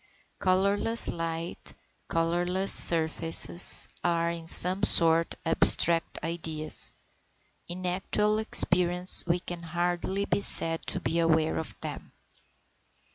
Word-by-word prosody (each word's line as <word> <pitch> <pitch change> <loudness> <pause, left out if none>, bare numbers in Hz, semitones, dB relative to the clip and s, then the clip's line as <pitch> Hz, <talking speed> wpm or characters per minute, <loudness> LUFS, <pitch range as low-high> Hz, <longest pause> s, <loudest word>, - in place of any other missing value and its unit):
Colourless 200 +5 0
light, 165 0 -6 0.3
colourless 175 +3 -2
surfaces, 165 +1 +2 0.2
are, 170 -1 -2
in 165 -1 -10
some 185 +3 +4
sort, 165 -4 +2
abstract 165 +1 +3
ideas; 160 -2 -2 0.7
in 180 +1 -8
actual 210 +4 -2
experience 180 -4 +3
we 175 +1 -1
can 175 -1 -9
hardly 175 +3 -4
be 200 - -3
said 165 -4 +4
to - - -1
be 170 - -4
aware 160 -1 -1
of 160 - -9
them. - - -9
170 Hz, 105 wpm, -25 LUFS, 165-185 Hz, 0.7 s, some